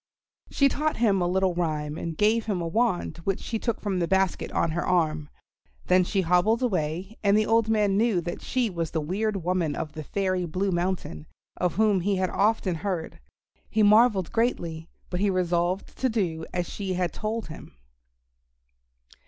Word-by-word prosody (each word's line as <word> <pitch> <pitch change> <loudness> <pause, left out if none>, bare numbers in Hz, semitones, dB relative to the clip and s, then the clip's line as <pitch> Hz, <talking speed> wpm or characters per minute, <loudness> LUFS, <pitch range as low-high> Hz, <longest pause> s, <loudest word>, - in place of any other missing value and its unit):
She 280 - +3
taught 300 +3 -1
him 205 -5 +2
a 175 - +1
little 190 0 +1
rhyme 155 -3 -2
and 165 -1 -5
gave 220 +2 +2
him 200 -4 0
a 170 - -2
wand 215 -1 0
which 190 +3 -2
she 225 - -4
took 235 -1 -2
from 195 -3 -2
the 170 - 0
basket 190 -1 0
on 165 - 0
her 170 +2 -1
arm; 155 -4 0 0.6
then 185 0 +4
she 190 +2 0
hobbled 180 +8 +2
away, 185 -1 -2
and 200 0 +4
the 215 - +3
old 225 0 +2
man 210 -3 +2
knew 220 -4 +2
that 175 +1 -5
she 250 -2 0
was 170 -5 -3
the 160 - -2
weird 195 +5 -2
woman 175 -4 0
of 155 - -4
the 155 - -6
Fairy 185 +1 -1
Blue 190 +4 -1
Mountain, 175 - -2 0.3
of 180 -2 -1
whom 210 -2 +3
he 195 +3 0
had 185 -1 0
often 205 -2 +1
heard. 170 -1 -4 0.5
He 215 - +2
marvelled 210 -3 +4
greatly, 170 -9 -1 0.2
but 180 - -2
he 205 +1 +2
resolved 180 0 0
to 260 - +2
do 175 -8 -2
as 175 -1 -2
she 195 -2 -4
had 180 -1 -1
told 215 -2 -4
him. 155 - -11
185 Hz, 185 wpm, -26 LUFS, 170-215 Hz, 0.6 s, then